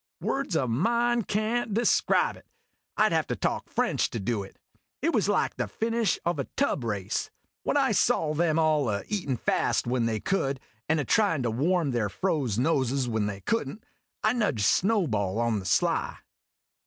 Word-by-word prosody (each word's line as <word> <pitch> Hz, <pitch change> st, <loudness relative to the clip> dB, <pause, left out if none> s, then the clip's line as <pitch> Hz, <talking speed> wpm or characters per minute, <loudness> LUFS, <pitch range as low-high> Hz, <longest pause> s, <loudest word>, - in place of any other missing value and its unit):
Words 275 Hz, -10 st, -1 dB
o' 130 Hz, -, +1 dB
mine 235 Hz, -, +1 dB
can't 215 Hz, +1 st, -1 dB
describe 235 Hz, -, +2 dB
it. -, -, -18 dB, 0.5 s
I 215 Hz, -, +5 dB
'd -, -, -2 dB
have 160 Hz, -1 st, +1 dB
to -, -, -2 dB
talk -, -, -2 dB
French -, -, 0 dB
to 115 Hz, -, -4 dB
do 105 Hz, +1 st, -1 dB
it. 95 Hz, -, -11 dB, 0.5 s
It -, -, +2 dB
was -, -, +2 dB
like -, -, +1 dB
the -, -, -1 dB
finish 225 Hz, -2 st, 0 dB
of 170 Hz, -3 st, 0 dB
a 140 Hz, -, -1 dB
tub 275 Hz, -, +1 dB
race. 105 Hz, -5 st, -2 dB, 0.3 s
When -, -, 0 dB
I -, -, +3 dB
saw 155 Hz, -1 st, +2 dB
them 160 Hz, 0 st, +1 dB
all 155 Hz, -5 st, +2 dB
a 100 Hz, -1 st, -2 dB
eatin' 175 Hz, -, -1 dB
fast -, -, 0 dB
when 120 Hz, -1 st, 0 dB
they 110 Hz, -1 st, -1 dB
could, 140 Hz, -, -1 dB, 0.3 s
and 160 Hz, 0 st, +3 dB
a 145 Hz, -, -1 dB
tryin' 195 Hz, -, +2 dB
to 115 Hz, -, 0 dB
warm 155 Hz, +5 st, +1 dB
their 115 Hz, -4 st, 0 dB
froze 135 Hz, -, -1 dB
noses 130 Hz, -1 st, +1 dB
when 110 Hz, -3 st, 0 dB
they 100 Hz, -1 st, -5 dB
could 230 Hz, -, -1 dB
n't, 210 Hz, +9 st, -10 dB, 0.4 s
I 215 Hz, -, +3 dB
nudged 205 Hz, -, 0 dB
Snowball 115 Hz, -, +1 dB
on 115 Hz, -2 st, +1 dB
the 95 Hz, -, -9 dB
sly. 90 Hz, -, +1 dB
145 Hz, 190 wpm, -27 LUFS, -, 0.5 s, I